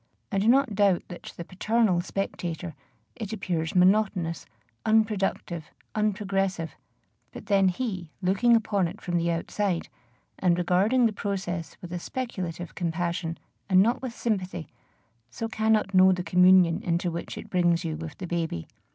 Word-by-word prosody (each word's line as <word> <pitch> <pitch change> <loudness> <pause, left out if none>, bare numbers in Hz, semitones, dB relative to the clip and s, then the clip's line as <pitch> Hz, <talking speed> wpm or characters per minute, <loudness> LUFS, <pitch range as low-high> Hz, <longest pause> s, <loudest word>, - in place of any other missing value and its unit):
I 195 - +1
do 205 - +1
not 260 -1 +4
doubt 200 -3 +3
that 175 - -8
to - - -11
the 170 - -6
paternal 205 -1 +1
spectator 175 -3 -4 0.4
it 220 -3 -6
appears 175 -6 -2
monotonous, 180 -4 +2 0.4
unproductive, 210 -7 0 0.2
unprogressive; 195 -5 -1 0.6
but - - -10
then 195 -2 +4
he, 185 -3 -2
looking 200 +6 +3
upon 205 -5 +1
it 185 +5 -8
from 175 -1 -2
the 170 0 0
outside, 170 +2 -1 0.5
and 175 -2 +3
regarding 195 +8 +3
the 220 - +2
process 185 -5 -4
with 175 0 -7
a 175 - -2
speculative 175 -8 -5
compassion, 170 -1 -2 0.3
and 185 0 +6
not 235 +4 +1
with 250 -3 -5
sympathy, 185 - -2 0.6
so 225 - -4
cannot 220 -2 +1
know 185 0 +7
the 180 -1 -1
communion 180 -1 +5
into 175 0 0
which 170 +1 -5
it - - -9
brings 175 -1 +2
you 160 -1 -2
with 160 -1 -7
the 185 - -5
baby. 165 - -3
185 Hz, 150 wpm, -27 LUFS, 170-210 Hz, 0.6 s, know